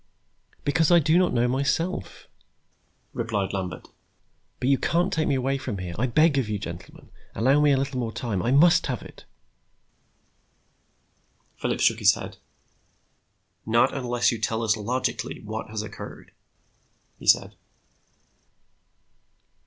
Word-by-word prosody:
"Because 150 +3 +2
I 175 - +7
do 160 0 +3
not 185 - +2
know 120 0 +2
myself," 140 - -2 0.9
replied 100 -4 -2
Lambert. 90 -2 -5 0.7
"But 125 - 0
you 135 - +3
can't 175 +4 +1
take 155 -1 0
me 140 - +2
away 135 +1 -1
from 105 -6 -4
here. 90 -2 -5
I 125 - +1
beg 145 +3 +3
of 120 -5 -2
you, 105 - -1
gentlemen, 85 -4 -9 0.2
allow 135 +7 +3
me 150 -1 +4
a 135 - +3
little 135 -1 -2
more 115 -2 -2
time. 105 -5 -3
I 115 - -1
must 165 +5 +5
have 125 -4 -3
it." - - -14 2.3
Phillips - - -2
shook - - +3
his - - +5
head. - - -8 1.3
"Not 120 +4 +2
unless 120 -3 +1
you 115 - -4
tell 110 +2 -1
us 110 -1 +2
logically 120 +4 -3
what - - -6
has - - -4
occurred," - - -10 0.9
he - - -11
said. - - +4
125 Hz, 140 wpm, -25 LUFS, 110-145 Hz, 2.3 s, I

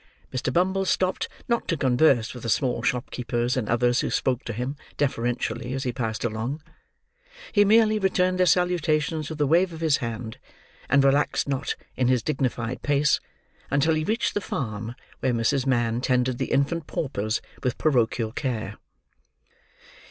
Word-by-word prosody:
Mr. 130 0 -1
Bumble 190 +5 +2
stopped 185 0 0 0.2
not 235 -1 0
to 165 - 0
converse 130 -3 +3
with 125 - -9
the 115 - -4
small 125 +2 +1
shopkeepers 125 -1 -1
and 125 -5 -2
others 120 +1 +2
who - - 0
spoke 130 -2 0
to - - -3
him, 125 +6 -3 0.2
deferentially, 125 -2 -1
as 135 0 -2
he 125 -3 -2
passed 110 -3 -3
along. 120 +6 -2 0.9
He 205 - +5
merely 215 0 +4
returned 185 -1 +1
their 185 - +4
salutations 155 -3 +1
with 160 -1 -6
a 145 - +3
wave 170 +5 +3
of 160 - -8
his 155 -3 +3
hand, 115 -2 -5 0.5
and 140 -1 +5
relaxed 140 +2 +2
not 140 0 -1 0.2
in 125 - +1
his 125 -3 +2
dignified 130 -4 -2
pace, 145 +1 +2 0.5
until 145 +4 +2
he 155 0 0
reached 220 +7 0
the 205 - -1
farm 115 - -4 0.2
where 130 - +1
Mrs. 125 +4 +1
Mann 120 -2 +1
tended 125 -1 +1
the - - -2
infant 150 +3 +1
paupers 110 -6 -2 0.2
with 125 - -1
parochial 120 -6 +1
care. 115 -5 -3
130 Hz, 160 wpm, -25 LUFS, 120-155 Hz, 0.9 s, He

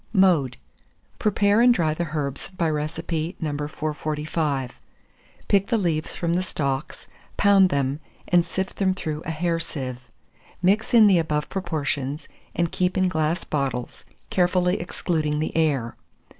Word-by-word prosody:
Mode. 170 - +3 0.6
Prepare 205 +1 +3
and 245 +1 +7
dry 165 -10 +2
the 170 +1 -3
herbs 140 +1 -3
by 180 -3 -1
recipe 160 +3 -3
No. 155 -3 -2
445; 150 -2 -2 0.8
pick 195 -1 +3
the 230 - +2
leaves 165 -6 -1
from 170 -1 -1
the 180 - +2
stalks, 140 -5 -3 0.3
pound 200 -2 +5
them, 140 -1 0 0.3
and 175 -1 +4
sift 190 +3 -4
them 190 -2 +2
through 155 -5 -4
a - - -2
hair 165 +1 0
sieve; 130 -6 -5 0.6
mix 200 +6 +2
in 225 -2 +8
the 190 -4 +5
above 150 -2 -1
proportions, 145 -5 -3 0.3
and 170 -1 0
keep 180 +1 0
in 185 -1 +3
glass 160 +1 0
bottles, 135 -4 -3 0.3
carefully 180 0 +2
excluding 155 -4 -1
the 155 - -2
air. 140 -8 +1
160 Hz, 145 wpm, -24 LUFS, 150-185 Hz, 0.8 s, in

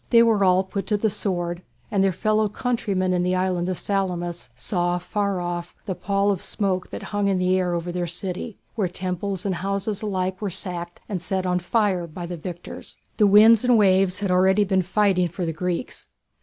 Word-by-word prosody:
They 230 -1 +7
were 220 -3 +3
all 185 0 +4
put 195 +1 -5
to 210 - +2
the 215 0 +1
sword 175 -4 -2 0.3
and 195 -2 +2
their 195 - +3
fellow 215 +3 +1
countrymen 200 -5 -1
in 180 - +1
the 180 +1 +1
island 185 -1 0
of 185 - -2
Salamis 175 -9 -2
saw 175 +6 -1
far 200 +1 -1
off 175 0 -4
the 195 - -2
pall 200 +2 +1
of 190 - -2
smoke 190 -3 -2
that - - -7
hung 205 -1 +1
over 180 -2 +1
their 175 0 -2
city, 185 +5 -4 0.2
where 205 -5 0
temples 185 +1 -3
and 195 - 0
houses 195 +3 -2
alike 190 -2 -2
were 205 - -1
sacked 175 -2 -4
and 190 -5 -3
set 190 +1 -1
on 180 0 +1
fire 185 -2 0
by 170 +2 -7
the 175 +1 -5
victors. 175 +1 -8 0.2
The 210 - +5
winds 215 +3 +7
and 245 -2 +5
waves 190 -1 +3
had 200 -2 0
already 190 +3 +4
been 190 -1 +2
fighting 190 -1 +2
for 175 +2 -4
the 165 - -2
Greeks. 180 +7 -3
185 Hz, 195 wpm, -24 LUFS, 180-200 Hz, 0.3 s, They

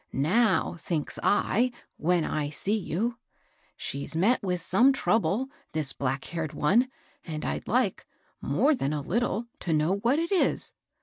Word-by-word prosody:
Now 180 - +2
thinks 155 -4 -3
I, 235 +4 +2 0.3
when 170 +1 +2
I 150 -1 -1
see 190 +8 -1
you, 220 +4 -2 0.3
* - - -39 0.3
She's 140 +3 -4
met 205 +10 +3
with 180 -2 -1
some 235 - +4
trouble, 230 0 +1 0.2
this 155 -3 0
black 135 0 -2
haired 165 -4 -4
one, 230 - +3 0.3
and 155 -2 -5
I'd - - -3
like, 235 -2 0 0.3
more 300 +3 +3
than* 150 - -1
a 145 -2 -2
Uttle, 230 - 0
to 165 - -1
know 155 +5 +2
what 235 +7 +2
it 335 +3 -1
is.' 385 - +1
190 Hz, 160 wpm, -27 LUFS, 155-235 Hz, 0.3 s, some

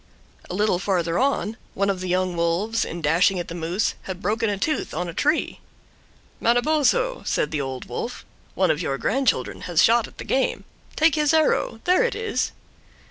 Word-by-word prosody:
A 180 - -4
little 205 -3 +2
farther 175 -4 0
on, 255 -4 0 0.2
one 200 +1 +1
of 190 - -4
the 185 0 -4
young 185 0 0
wolves, 170 +7 0
in 170 0 -6
dashing 175 +5 +3
at 175 - -4
the - - -5
moose, 175 +4 -1 0.2
had 185 -1 -4
broken 215 +3 0
a 205 - -1
tooth 305 - -2
on 180 +2 -2
a 170 - -6
tree. 300 - 0 0.8
"Manabozho," 310 - +2
said 150 - 0
the 150 -2 -1
Old 130 -1 -5
Wolf, - - -5 0.3
"one - - +3
of - - -1
your 135 - -1
grandchildren 255 - 0
has 170 -3 +4
shot 230 0 +4
at - - -18
the - - -6
game. 265 - 0 0.3
Take 320 0 +4
his 300 0 +2
arrow; 300 -7 +1
there 365 +7 +4
it 480 - 0
is." 445 +1 -1
200 Hz, 190 wpm, -23 LUFS, 175-275 Hz, 0.8 s, has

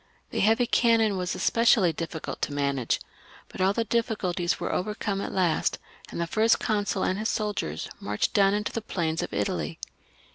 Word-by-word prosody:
The - - -2
heavy 225 +4 +4
cannon 230 -3 +3
were 185 - -2
especially 195 0 +3
difficult 165 0 -5
to 145 - -1
manage; 140 -4 0 0.5
but - - -7
all 190 +1 +4
the 230 +3 0
difficulties 205 -6 -1
were - - -2
overcome 205 0 -2
at - - -4
last, 180 -4 +1 0.3
and - - -6
the 170 - +1
First 220 +6 +3
Consul 205 -3 0
and 185 - 0
his 220 - -1
soldiers 205 - -2
marched 105 0 -1
down 200 0 +4
into 210 0 -2
the 230 - -3
plains 165 -6 -2
of - - -4
Italy. 85 -6 -2
195 Hz, 175 wpm, -27 LUFS, 165-215 Hz, 0.5 s, heavy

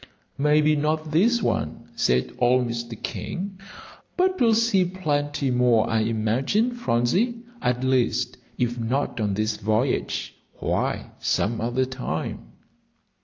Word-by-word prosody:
"Maybe 150 +1 +4
not 155 +1 -1
this 225 +8 +3
one," 75 - -2
said 60 0 +1
old 125 0 +3
Mr. 115 -1 -5
King; 190 +1 -5 0.6
"but 370 +1 +2
we'll 230 -2 +5
see 225 -4 +3
plenty 145 -6 -1
more, 125 -3 +3
I 110 - +1
imagine, 115 - +1
Phronsie. 230 - 0 0.2
At 125 -1 0
least, 130 -2 +1 0.2
if 120 0 -1
not 125 +2 -1
on 105 -3 0
this 110 +1 -1
voyage, 110 +5 -1 0.2
why, - - -1
some 110 +2 0
other 120 +3 +1
time." 130 0 -4
130 Hz, 120 wpm, -24 LUFS, 115-180 Hz, 0.6 s, we'll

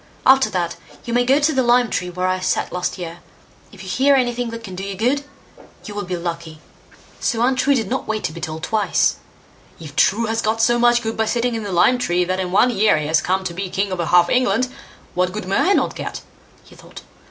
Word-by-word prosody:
After 265 0 +5
that, 170 -2 -2 0.3
you 235 - -4
may 245 +1 +3
go 265 +3 +4
to 305 +2 +2
the 265 - +2
lime 245 0 +3
tree 180 0 -2
where 180 +1 -3
I 185 0 0
sat 185 - -1
last 180 +2 -2
year; 170 -1 -7 0.5
if 195 -2 -12
you - - -10
hear 275 +8 +3
anything 245 -2 0
that 230 0 -7
can 190 -4 -8
do 185 +1 -6
you 195 0 -5
good, 250 +8 0 0.6
you 210 - -7
will 205 -1 -4
be 180 0 -3
lucky." 170 -2 -6 0.6
So 230 0 0
Untrue 265 +2 +2
did 225 -6 -1
not 260 +5 -3
wait 215 0 -2
to - - -2
be 170 +1 -9
told 160 0 -5
twice. 210 -4 +1 0.6
"If 155 -3 -10
True 225 +4 +3
has 225 +1 -1
got 220 +1 -1
so 240 +1 +3
much 240 0 +3
good 225 0 -3
by 220 0 0
sitting 240 +1 0
in 225 - -3
the 205 -2 -5
lime 185 +8 +3
tree, 180 -6 +1
that 185 +1 -2
in 180 -1 -3
one 240 +6 +4
year 215 -5 +3
he 150 - -2
has 155 +1 +2
come 190 +1 0
to 175 - -4
be 190 +2 -4
king 195 +1 -2
over 175 -2 -2
half 175 +2 +5
England, 250 +1 +1 0.4
what 180 0 0
good 210 -1 -6
may 195 - +2
not - - 0
I - - -12
get", - - -5 0.4
he - - -18
thought. - - -13
205 Hz, 245 wpm, -20 LUFS, 180-240 Hz, 0.6 s, After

